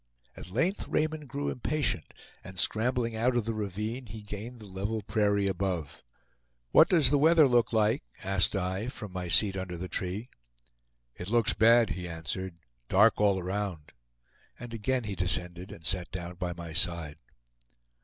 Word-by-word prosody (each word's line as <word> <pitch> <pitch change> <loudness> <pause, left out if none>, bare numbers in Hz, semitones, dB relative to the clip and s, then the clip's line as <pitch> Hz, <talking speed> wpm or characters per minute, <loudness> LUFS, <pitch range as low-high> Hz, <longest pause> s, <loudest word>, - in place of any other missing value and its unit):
At - - -9
length 165 - 0
Raymond 155 -1 -1
grew 140 +3 -2
impatient, 140 - -1 0.3
and 95 0 -10
scrambling 115 +4 +1
out 120 +3 +1
of 120 -3 +1
the 115 - -1
ravine, 110 +4 -4
he 110 +1 -9
gained 105 +4 -7
the 105 - -11
level 100 +3 -3
prairie 100 -1 +1
above. 95 -5 -2 0.7
"What - - +7
does 165 -6 +5
the 145 - +4
weather 160 0 +6
look 120 -2 +3
like?" 110 +4 +2 0.2
asked 95 +1 +1
I, 95 +3 -2
from 110 -5 -7
my 90 -1 -4
seat 95 +2 +4
under 95 -2 -4
the 90 +2 -5
tree. 95 +7 -4 0.8
"It 90 - -7
looks 115 -1 +3
bad," 115 0 +5
he 90 -1 -4
answered; 85 +2 -5 0.3
"dark 105 +3 +5
all 100 -2 +4
around," 95 -4 -4 0.7
and 120 -1 -8
again 125 +3 -1
he 105 -2 -4
descended 90 0 -1
and 80 - -11
sat 90 0 +1
down 85 0 -5
by 90 -1 -3
my 85 -2 -8
side. 85 -3 0
100 Hz, 165 wpm, -29 LUFS, 90-115 Hz, 0.8 s, What